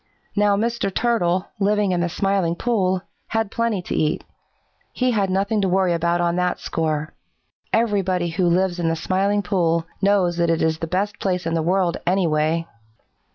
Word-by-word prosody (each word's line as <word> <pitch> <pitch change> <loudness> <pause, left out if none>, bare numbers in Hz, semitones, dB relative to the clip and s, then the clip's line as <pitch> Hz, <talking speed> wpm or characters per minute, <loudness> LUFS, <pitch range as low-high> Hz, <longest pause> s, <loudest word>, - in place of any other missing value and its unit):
Now 205 -1 +3
Mr. 230 -2 -1
Turtle, 185 -5 0
living 205 -1 +2
in 180 - +1
the 175 - 0
Smiling 195 -2 0
Pool, 190 -4 0 0.2
had 225 -2 -1
plenty 230 -5 -1
to - - -4
eat. 155 -1 0 0.7
He 255 0 0
had 200 -4 +1
nothing 200 +3 +1
to 190 - +1
worry 185 -1 +2
about 170 +1 +1
on 175 0 +1
that 180 0 0
score. 155 -2 -2 0.6
Everybody 190 -6 +1
who 175 +2 0
lives 180 +1 +1
in 165 -1 +1
the 165 - 0
Smiling 195 +4 0
Pool 170 -3 +1 0.2
knows 195 -4 +2
that 170 -1 +2
it 165 -1 +1
is 160 0 +1
the 165 - -3
best 195 +4 -2
place 180 -2 -1
in 165 - -1
the 165 - +1
world, 175 +1 +1
anyway." 165 -3 +1
185 Hz, 175 wpm, -22 LUFS, 170-200 Hz, 0.7 s, Now